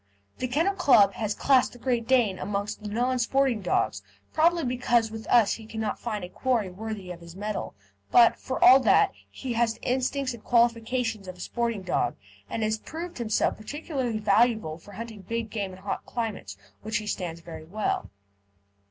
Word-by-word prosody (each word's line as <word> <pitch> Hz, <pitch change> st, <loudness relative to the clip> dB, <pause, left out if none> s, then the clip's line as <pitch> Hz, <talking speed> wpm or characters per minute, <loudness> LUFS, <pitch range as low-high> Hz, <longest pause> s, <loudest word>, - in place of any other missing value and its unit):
The 255 Hz, -, -1 dB
Kennel 325 Hz, +10 st, +1 dB
Club 255 Hz, -, +5 dB
has 215 Hz, 0 st, -2 dB
classed 265 Hz, -3 st, +3 dB
the -, -, -12 dB
Great 240 Hz, -2 st, -1 dB
Dane 235 Hz, -8 st, +3 dB
amongst 205 Hz, +2 st, -3 dB
the 210 Hz, -, -5 dB
Non 250 Hz, +4 st, 0 dB
Sporting 255 Hz, -2 st, +2 dB
dogs, 100 Hz, -, 0 dB, 0.3 s
probably 335 Hz, +1 st, +3 dB
because 240 Hz, -2 st, +1 dB
with 220 Hz, 0 st, -7 dB
us 235 Hz, -4 st, +5 dB
he 220 Hz, -1 st, -8 dB
cannot 220 Hz, -1 st, -3 dB
find 215 Hz, -5 st, -4 dB
a 180 Hz, -, -6 dB
quarry 230 Hz, -4 st, 0 dB
worthy 205 Hz, -1 st, -6 dB
of 175 Hz, -1 st, -9 dB
his 170 Hz, 0 st, -12 dB
mettle; 210 Hz, +1 st, -4 dB, 0.3 s
but, 235 Hz, -1 st, +6 dB
for 260 Hz, -, -4 dB
all 260 Hz, +2 st, +9 dB
that, -, -, +4 dB, 0.2 s
he 255 Hz, -3 st, -5 dB
has 230 Hz, -1 st, +1 dB
the -, -, -21 dB
instincts 260 Hz, +1 st, 0 dB
and 235 Hz, -, -11 dB
qualifications 230 Hz, -2 st, +1 dB
of 185 Hz, 0 st, -8 dB
a -, -, -18 dB
sporting 230 Hz, 0 st, -2 dB
dog, 185 Hz, -, 0 dB, 0.3 s
and 225 Hz, -, -2 dB
he -, -, +2 dB
has 215 Hz, 0 st, 0 dB
proved 335 Hz, +2 st, -7 dB
himself 220 Hz, -2 st, +1 dB
particularly 260 Hz, -1 st, -3 dB
valuable 215 Hz, -5 st, +2 dB
for 205 Hz, +4 st, -14 dB
hunting 220 Hz, 0 st, -7 dB
big 225 Hz, +3 st, -4 dB
game 200 Hz, -4 st, -3 dB
in 185 Hz, -, -11 dB
hot 195 Hz, +2 st, -4 dB
climates, 210 Hz, -, -4 dB, 0.2 s
which 215 Hz, 0 st, -1 dB
he 215 Hz, -, -5 dB
stands 175 Hz, -5 st, -4 dB
very 165 Hz, -2 st, -9 dB
well. 205 Hz, +5 st, -2 dB
225 Hz, 185 wpm, -27 LUFS, 205-250 Hz, 0.3 s, all